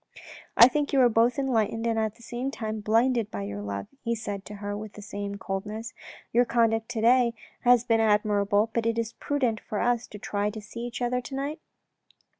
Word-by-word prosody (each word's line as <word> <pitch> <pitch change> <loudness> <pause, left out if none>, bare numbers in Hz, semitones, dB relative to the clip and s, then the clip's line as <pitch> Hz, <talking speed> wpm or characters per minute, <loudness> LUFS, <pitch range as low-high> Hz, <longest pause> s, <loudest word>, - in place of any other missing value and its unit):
" - - -14
I 235 - +11
think 290 +2 -1
you 275 - +4
are 245 - +6
both 230 +2 +3
enlightened 230 -4 0
and 225 -1 +1
at 220 -1 -1
the 235 - -18
same 245 +3 -3
time 220 -5 -4
blinded 230 +2 +2
by 100 - -5
your 100 +1 -5
love," 100 -1 -4 0.2
he 235 0 0
said 205 -3 -5
to 210 - -8
her 205 0 -4
with 210 0 -8
some 200 0 -5
coldness. 210 +4 -5 0.2
" - - -21
Your 240 +2 +5
conduct 225 -2 +1
to 230 -2 -3
day 235 0 +4 0.2
has 245 -1 +5
been 230 -2 +2
admirable, 210 0 +2
but 230 -1 0
is 230 0 0
it - - -40
prudent 255 -7 0
for 210 - -4
us 240 -1 +1
to 210 - -10
try 205 0 -2
and 210 0 -5
see 235 +3 -6
each 245 +1 -5
other 250 +1 0
to 265 +2 -7
night? 285 +4 -3
225 Hz, 220 wpm, -27 LUFS, 210-240 Hz, 0.2 s, I